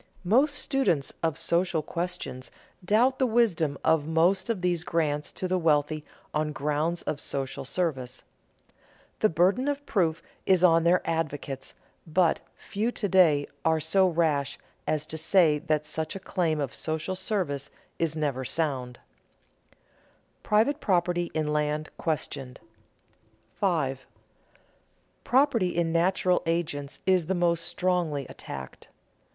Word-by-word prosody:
Most 270 +10 +3
students 265 - 0
of 160 -3 0
social 170 -2 +1
questions 170 -6 -4 0.3
doubt 235 +8 +3
the 260 - +3
wisdom 190 - +2
of 155 -2 +3
most 175 +6 +2
of 220 -6 -1
these 175 -2 0
grants 150 -4 -1
to 185 - -3
the 185 0 +1
wealthy 155 -2 +1 0.3
on 155 0 0
grounds 150 +4 -1
of 145 - -3
social 135 -1 -3
service. 130 -4 -3 1.0
The 215 - +4
burden 185 - +2
of 285 0 -2
proof 165 -5 0 0.2
is 185 -2 +4
on 165 -2 +5
their 175 +2 +4
advocates, 145 -4 -3 0.3
but 165 +1 +2 0.2
few 220 +4 -2
to 215 - -2
day 165 -7 +4 0.2
are 160 0 +3
so 190 +5 +3
rash 155 -5 0 0.3
as 155 -1 0
to 160 - -5
say 160 -2 +4
that 155 -1 -1
such 155 +4 -3
a - - -4
claim 170 -4 -1
of 140 -4 -2
social 160 +3 -2
service 180 - -2 0.3
is 165 -2 0
never 140 -4 -1
sound. 130 -4 -2
[Sidenote: - - -36
Private 225 +8 +2
property 175 -3 +1
in 155 -1 0
land 150 +1 -1
questioned] 140 -5 -3 0.9
5. 140 -9 -1 1.2
_Property 245 -8 +3
in 170 -1 +1
natural 180 +1 +2
agents 150 -4 -2
is 185 -4 +3
the 190 - 0
most 170 -1 +2
strongly 175 -8 -1
attacked. 65 - -8
165 Hz, 135 wpm, -27 LUFS, 150-185 Hz, 1.2 s, on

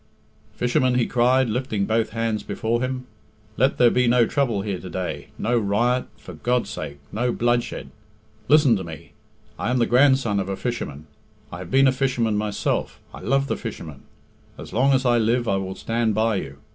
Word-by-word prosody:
"Fishermen," 125 +1 +1
he 125 -2 +2
cried, 125 +2 +3
lifting 110 -3 -1
both 110 +1 0
hands 115 -1 -2
before 115 +3 -2
him, 130 0 -3 0.5
"let 130 +5 +2
there 120 -1 +5
be 125 -1 +2
no 120 0 +4
trouble 120 -7 0
here 100 -3 -3
to 90 - -9
day, 90 +1 -4
no 120 +3 0
riot, 115 +5 +1
for - - -11
God's 125 0 -1
sake, 70 - -6
no 120 +4 0
bloodshed. 120 0 -1 0.6
Listen 145 -4 +5
to 95 - -3
me. 80 -3 -10 0.5
I - - -1
am 125 - +1
the 120 - +3
grandson 130 -5 +3
of 95 0 -3
a 95 - -2
fisherman; 80 - -4 0.5
I 90 - -7
have 90 -1 -8
been 135 0 +5
a - - +5
fisherman 125 -4 0
myself; 105 -1 -2
I - - -9
love 135 +1 +1
the - - -2
fishermen. 80 - -7 0.6
As - - -10
long 130 +5 +3
as 130 -1 +2
I 120 -1 +4
live 120 +2 +1
I 100 - +2
will 95 0 -4
stand 115 -2 -1
by 110 -1 +2
you. 70 -6 -6
120 Hz, 190 wpm, -23 LUFS, 105-125 Hz, 0.6 s, there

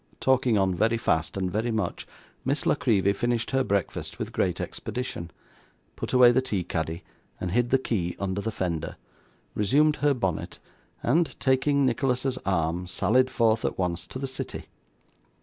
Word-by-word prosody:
Talking 130 -4 +3
on 95 -1 +2
very 110 +6 +2
fast 80 -6 0
and 95 -1 -1
very 110 +4 -1
much, 110 -2 -2 0.4
Miss 140 +3 -1
La - - +4
Creevy 100 -8 +2
finished 120 +2 -1
her 135 0 +2
breakfast 100 -6 -2
with - - -4
great 90 -2 0
expedition, 120 -8 -5 0.7
put - - -5
away 125 -1 +7
the 130 - +3
tea 105 -8 -2
caddy 80 +1 -3 0.4
and 90 - -3
hid 120 +4 +2
the 135 - +5
key 95 -9 -2
under 100 0 -2
the 110 - -2
fender, 85 -6 -3 0.6
resumed 150 +9 +3
her 145 -1 +2
bonnet, 95 -9 -2 0.5
and, 160 +6 +1
taking 135 +1 +2
Nicholas's 130 +1 0
arm, 85 -1 0
sallied 125 +8 +2
forth 115 -3 +2
at - - -1
once 90 -2 -2
to - - -7
the 135 - -3
city. 130 0 -6
115 Hz, 165 wpm, -26 LUFS, 95-130 Hz, 0.7 s, away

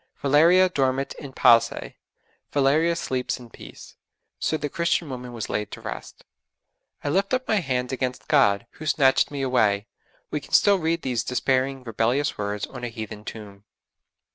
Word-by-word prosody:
'Valeria 165 +7 +5
dormit 135 -5 0
in 140 -3 -8
pace.' 115 -2 +3 0.6
Valeria 150 +4 +3
sleeps 130 -6 -2
in 120 -2 -13
peace. - - -13 0.4
So 155 - 0
the 150 - -3
Christian 170 0 -1
woman 125 -1 -7
was 115 -3 -5
laid 105 -2 -2
to - - -7
rest. - - -8 0.8
'I - - -1
lift 195 - +1
up 255 0 -4
my 215 - +2
hands 130 -7 -1
against 130 -1 -3
God, 120 -8 +3
who 155 - -9
snatched 135 -4 +3
me 140 -2 -4
away.' 105 -6 +2 0.5
We 150 - -1
can - - -15
still 200 -2 +5
read 165 0 -1
these 125 -3 -1
despairing, 130 +1 0
rebellious 120 +5 0
words 105 0 -3
on 125 -2 -10
a - - -1
heathen 110 -2 -7
tomb. 100 -3 -9
130 Hz, 165 wpm, -24 LUFS, 120-155 Hz, 0.8 s, Valeria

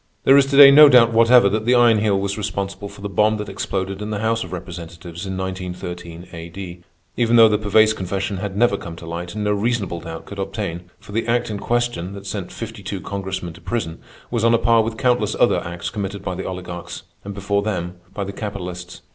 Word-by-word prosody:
There 135 - +6
is 140 -1 +5
to 140 0 0
day 140 -1 +11
no 150 +1 +9
doubt 115 -3 +6
whatever 115 0 +6
that 110 +2 -1
the 125 - +5
Iron 120 -3 +5
Heel 105 -2 +1
was 100 0 -2
responsible 100 -1 -4
for 100 0 -13
the 100 - -3
bomb 105 +3 +2
that 105 0 -5
exploded 95 +1 -3
in 105 - -4
the 105 - -2
House 115 +2 0
of 95 - -10
Representatives 85 0 -8
in 95 0 -4
1913 90 -2 -6
A.D. 85 +1 -8 0.3
Even 120 -1 +2
though 115 -1 +8
the 105 -1 +1
Pervaise 110 +1 +4
confession 95 0 -3
had 100 +1 -5
never 120 -2 +3
come 85 -3 -8
to 85 0 -11
light, 85 +2 -6
no 105 -1 -1
reasonable 100 -5 -1
doubt 80 0 -8
could 100 - -9
obtain; 95 -3 -4
for - - -14
the 115 +3 -2
act 120 -1 0
in 105 - -4
question, 120 -7 -1
that 100 0 -9
sent 100 -3 -5
fifty 115 -2 -7
two 95 0 -5
Congressmen 95 -3 -5
to 85 - -15
prison, 85 -3 -3 0.3
was 115 -2 -1
on 115 0 +5
a - - +4
par 115 0 +4
with 110 0 -3
countless 125 -1 +1
other - - +3
acts 85 +1 -5
committed 100 -2 -5
by 95 - -3
the - - -5
oligarchs, 90 -2 -7 0.2
and, 100 0 -7
before 100 0 0
them, 90 -4 -3
by 100 - -4
the 100 0 -6
capitalists. 90 -4 -6
100 Hz, 225 wpm, -21 LUFS, 90-110 Hz, 0.3 s, day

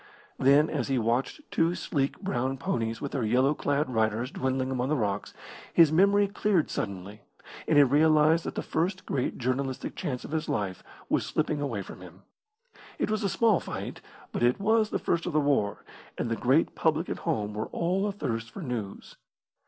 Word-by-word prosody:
Then, 140 +3 +5
as 140 -7 -2
he 135 -2 +1
watched 120 - 0
two 165 +2 +2
sleek, 140 -5 -2
brown 135 -8 -2
ponies 115 -4 -2
with 140 - -4
their 135 - -1
yellow 130 +6 +3
clad 145 0 0
riders 110 +1 0
dwindling 130 0 -1
among 130 0 -1
the 155 - +2
rocks, 105 -7 -2 0.4
his 165 -3 +7
memory 200 +4 +4
cleared 195 -4 +1
suddenly, 100 +1 -5 0.5
and 150 - +3
he 145 - +9
realised 155 +3 +4
that - - -4
the - - -2
first 185 +4 -1
great 130 -2 -2
journalistic 130 +1 -2
chance 135 -8 -4
of - - -9
his 160 0 -2
life 100 -4 -2 0.3
was - - +1
slipping 155 -1 -1
away 115 -9 -2
from 90 - -11
him. 90 +2 -13 0.7
It - - -1
was 215 -1 -1
a 200 - +1
small 220 +1 +3
fight, - - -6 0.3
but - - -3
it 120 +1 +3
was 220 +1 +2
the - - -1
first 170 0 -1
of 175 - -3
the 155 - +4
war, 140 -8 0 0.3
and 120 - -2
the - - +1
great 130 +8 +2
public 160 +1 +1
at - - -4
home 105 -11 -2
were 110 +1 -3
all 185 +4 0
athirst 115 - -3
for 175 - -8
news. 115 -7 -6
140 Hz, 190 wpm, -28 LUFS, 120-165 Hz, 0.7 s, he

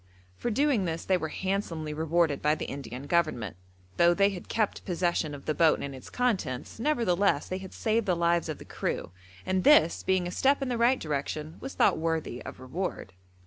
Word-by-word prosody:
For 240 - -3
doing 250 -3 +2
this 165 -1 -3
they 190 - +3
were 160 -3 -1
handsomely 170 -5 -2
rewarded 160 -1 +1
by 150 +1 +3
the - - -5
Indian 135 -1 -6
Government, 145 - 0 0.4
though 170 0 +5
they 200 +1 +4
had 180 -3 -8
kept 215 -3 -1
possession 175 -4 -1
of 140 - -12
the 155 - 0
boat 160 0 +4
and 140 - -5
its 130 - -10
contents; 205 - -1
nevertheless, 205 - +2
they 185 - -3
had 190 -1 -9
saved 220 -1 0
the 180 - +3
lives 170 0 +1
of 155 - -3
the - - -12
crew, - - -3 0.3
and 185 0 0
this, 280 - +5
being 185 -1 +1
a 175 - -3
step 275 +8 +3
in 265 - -2
the 245 - -1
right 245 +2 +4
direction, 150 +1 -3
was 270 - -7
thought - - +3
worthy 160 -6 -2
of - - -9
reward. 130 - -4
170 Hz, 200 wpm, -28 LUFS, 155-200 Hz, 0.4 s, though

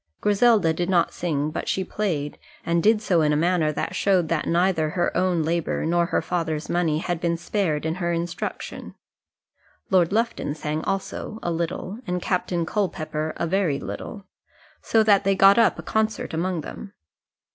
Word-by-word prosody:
Griselda 210 -4 +3
did 175 +2 -2
not 175 -3 +2
sing, 155 -3 -1
but - - -4
she 190 - 0
played; 170 -8 -3 0.3
and 170 0 +1
did 215 +2 +3
so 175 -5 +3
in 150 -1 +3
a - - +2
manner 165 -1 +2
that - - -3
showed 185 -5 +2
that 165 -2 -1
neither 170 -2 +2
her 175 +2 -1
own 180 -2 +1
labour 165 0 -1
nor 170 +1 +2
her 170 - 0
father's 160 -3 -2
money 170 -3 +1
had 175 +1 -3
been 170 -1 0
spared 170 -4 -1
in 160 - 0
her 175 -1 -2
instruction. 170 0 -4 1.0
Lord 180 -2 +4
Lufton 225 -8 -1
sang 155 +1 -3
also, 195 +2 -3
a 175 - -1
little, 170 +5 -3
and 180 0 -1
Captain 180 -2 -1
Culpepper 155 -5 -2
a - - -1
very 170 -5 +1
little; 200 -2 -7 0.6
so 225 -1 +3
that 205 -2 +4
they 195 0 +2
got 195 +3 +6
up - - +4
a - - -7
concert 220 -3 -1
among 175 +1 -1
them. 195 +6 -9
175 Hz, 175 wpm, -24 LUFS, 160-195 Hz, 1.0 s, got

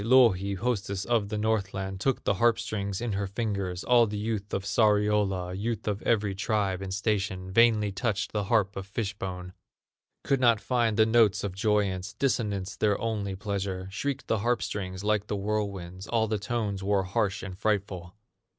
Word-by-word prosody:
Louhi, 105 -5 +4
hostess 100 -3 -2
of 115 -4 +1
the 105 - -2
Northland, 95 -3 -1
Took 135 +5 0
the - - +2
harp 115 +3 +3
strings 100 -3 -3
in 120 -2 -2
her 100 0 -1
fingers; 100 -4 -3
All 120 -2 +5
the 105 0 -4
youth 105 -1 -3
of 95 - -2
Sariola, 105 -3 +2
Youth 110 +2 -3
of 105 0 -1
every 105 -3 +1
tribe 95 -1 -1
and 95 -1 -5
station, 95 -2 -1
Vainly 110 -1 +4
touched 105 -1 -1
the 105 -2 -1
harp 100 -2 +2
of 95 0 -6
fish 100 0 -3
bone; 90 -2 -6 0.7
Could 135 - +1
not 120 -4 +4
find 115 -3 +1
the 110 - +6
notes 110 -3 +3
of 100 -3 -3
joyance, 100 -2 0
Dissonance 100 -8 -1
their 105 -2 +1
only 105 -4 -2
pleasure; 95 -2 -3
Shrieked 135 +6 -3
the 110 - 0
harp 120 +4 +1
strings 95 -1 -4
like 105 -1 +1
the 105 - -2
whirlwinds, 100 -2 -3
All 115 -2 +1
the 110 -1 -1
tones 105 -2 -2
wore 100 0 +1
harsh 95 +1 -1
and 95 -2 -6
frightful. 95 -3 -2
100 Hz, 180 wpm, -28 LUFS, 95-110 Hz, 0.7 s, the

